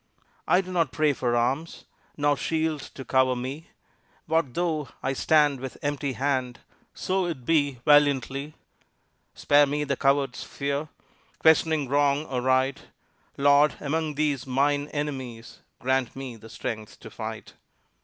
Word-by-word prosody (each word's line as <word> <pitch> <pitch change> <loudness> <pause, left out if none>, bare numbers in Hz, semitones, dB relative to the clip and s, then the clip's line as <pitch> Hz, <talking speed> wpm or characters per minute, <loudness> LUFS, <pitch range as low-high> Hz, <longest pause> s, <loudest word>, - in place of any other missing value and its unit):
I 180 - +4
do 185 -1 -9
not 165 -6 +1
pray 155 0 +2
for 120 -2 -1
arms, 130 +8 -1 0.3
Nor 145 0 +2
shield 160 0 -1
to 135 - -8
cover 130 -1 +3
me. 130 +6 -6 0.6
What 160 -5 0
though 160 -5 -1
I 135 - 0
stand 145 -1 +3
with 130 0 -7
empty 145 -1 -1
hand, 130 -1 -1 0.4
So 185 -1 -1
it 135 -8 -5
be 145 -5 +1
valiantly! 145 0 +3 0.8
Spare 145 0 +4
me 145 +1 -1
the 140 -1 -1
coward's 135 -1 +1
fear 140 +2 -3 0.5
Questioning 160 -2 +3
wrong 145 +2 +2
or 125 -4 -3
right: 130 +1 +2 0.6
Lord, 145 +1 +4
among 155 +1 -2
these 145 -4 -1
mine 145 +2 +1
enemies, 130 -6 -5 0.2
Grant 130 -1 0
me 135 -3 -6
the 115 0 -13
strength 110 -1 -6
to - - -10
fight. - - -7
140 Hz, 140 wpm, -26 LUFS, 130-150 Hz, 0.8 s, I